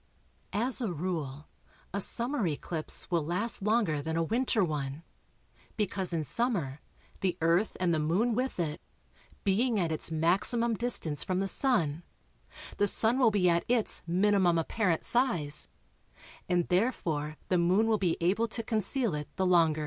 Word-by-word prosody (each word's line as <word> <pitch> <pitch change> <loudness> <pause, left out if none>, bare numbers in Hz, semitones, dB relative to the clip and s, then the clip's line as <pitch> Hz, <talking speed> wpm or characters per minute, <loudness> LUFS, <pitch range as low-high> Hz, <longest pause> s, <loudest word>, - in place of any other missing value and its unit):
As 240 +6 0
a 220 -6 -1
rule, 155 -4 -4 0.5
a 200 - -1
summer 235 0 0
eclipse 160 +3 +1
will 170 -3 +1
last 185 +10 -1
longer 210 -8 +1
than 160 +2 -3
a 165 - +2
winter 230 +2 +1
one, 150 -2 -3 0.7
because 195 -3 -1
in 165 -2 -1
summer 160 - -2 0.4
the 185 -3 -1
Earth 170 +6 +1
(and 180 -2 +1
the 160 - +1
Moon 185 +11 +1
with 255 -2 -2
it), 155 -2 -2 0.6
being 220 +3 +1
at 170 -3 0
its 155 - 0
maximum 195 +9 +2
distance 205 - -2
from 185 0 -1
the 195 - 0
Sun, 175 - +1 0.8
the 205 - +3
Sun 225 +5 +3
will 245 -4 +5
be 200 -4 +2
at 170 -1 +2
its 235 -3 0
minimum 185 -1 +3
apparent 170 +1 0
size, 175 - -1 0.8
and 175 -1 +1
therefore 165 -7 -1
the 180 - +2
Moon 185 +6 +3
will 220 -2 +1
be 180 -4 0
able 200 +7 +1
to 230 +1 -4
conceal 220 - -1
it 150 0 -4
the 190 - 0
longer. 165 -4 +3
185 Hz, 155 wpm, -30 LUFS, 165-225 Hz, 0.8 s, will